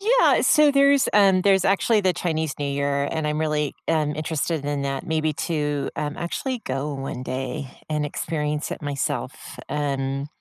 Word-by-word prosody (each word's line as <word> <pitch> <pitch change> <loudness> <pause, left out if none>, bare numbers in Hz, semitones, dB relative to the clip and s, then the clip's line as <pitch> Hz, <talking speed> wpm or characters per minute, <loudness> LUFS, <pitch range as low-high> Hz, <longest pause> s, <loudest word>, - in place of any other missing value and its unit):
Yeah. - - +4
So 300 -1 +5
there's, 280 0 +4
um, 195 -3 +5
there's 195 -1 +4
actually 200 +3 +3
the 185 -1 +3
Chinese 160 -4 -2
New 145 - -1
Year, 140 0 0
and 160 -2 -2
I'm 150 0 -1
really, 150 -2 0
um, 150 -2 +1
interested 155 0 -2
in 145 -1 -1
that, 135 0 -3
maybe 155 -1 0 0.2
to, 150 -3 -1
um, 145 -1 -3
actually 245 +9 -3
go 135 +3 -2
one 135 -2 -5
day 130 +2 -4 0.2
and 150 -1 -1
experience 150 0 -2
it - - -6
myself. 145 -2 -4
Um, 140 -1 -1
150 Hz, 165 wpm, -24 LUFS, 140-175 Hz, 0.2 s, So